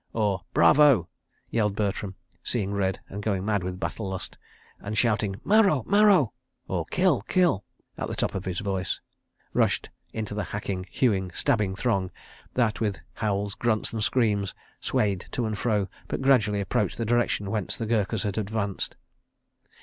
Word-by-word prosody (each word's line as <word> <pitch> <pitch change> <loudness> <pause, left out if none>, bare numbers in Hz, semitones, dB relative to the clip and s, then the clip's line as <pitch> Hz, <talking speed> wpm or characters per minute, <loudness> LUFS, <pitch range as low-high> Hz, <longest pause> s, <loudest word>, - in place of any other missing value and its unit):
{224a} 105 - +4 0.5
yelled 105 -3 +1
Bertram, 100 -2 -2 0.3
seeing 100 -4 -1
red, 95 -1 0
and 100 - -6
going 100 -3 -1
mad 105 -2 +1
with 90 0 -4
battle 100 +1 -3
lust, 95 -1 -5 0.4
and 105 +1 -4
shouting 105 -3 +2
"Maro! 200 - +4
Maro!" 200 - +5 0.3
{224b} 165 - +2 0.4
at - - -2
the - - -4
top - - -1
of 95 - -4
his 95 0 -2
voice, 95 -2 -2 0.5
rushed - - +1 0.2
into 110 -1 -4
the 105 0 -2
hacking, 95 -3 -4
hewing, 100 -7 +1
stabbing 105 -9 +1
throng 95 -4 0 0.5
that, 115 -4 +2
with 105 -4 -1
howls, 100 -2 -1
grunts, 115 -1 0
and 110 -2 -1
screams, 105 -5 +1 0.2
swayed 100 -3 0
to 120 - -1
and 110 -2 -3
fro, 105 -5 +1 0.2
but - - -2
gradually 110 -7 +3
approached 100 0 0
the 115 - -1
direction 115 -3 +1
whence 105 -3 -2
the 115 - -2
Gurkhas 110 -2 0
had 100 +1 -1
advanced. 100 -1 -2
105 Hz, 150 wpm, -27 LUFS, 100-115 Hz, 0.5 s, Maro